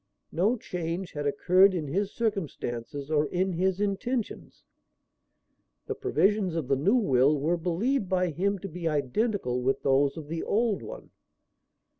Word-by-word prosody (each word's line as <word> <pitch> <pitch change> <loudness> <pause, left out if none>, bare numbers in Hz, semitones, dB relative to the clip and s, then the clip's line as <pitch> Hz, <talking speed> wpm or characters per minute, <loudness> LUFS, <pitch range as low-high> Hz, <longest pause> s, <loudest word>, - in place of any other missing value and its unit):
No 205 +9 +1
change 175 -2 -4
had 145 -1 -3
occurred 185 +7 +4
in 155 -4 -3
his 195 +7 -1
circumstances 145 - -3
or 150 -1 +2
in 185 +1 -1
his 185 +2 0
intentions. 205 +4 -3 1.2
The 435 - -3
provisions 210 - +1
of 160 -6 -2
the 135 - +2
new 175 - +2
will 140 - +3
were 160 +5 +1
believed 185 +7 -1
by 180 -2 +1
him 200 +6 0
to - - -2
be 170 -1 -5
identical 150 - 0
with 130 +2 0
those 140 +1 +2
of 155 -2 -7
the 165 +1 -3
old 220 -1 0
one. - - -9
180 Hz, 150 wpm, -28 LUFS, 145-205 Hz, 1.2 s, occurred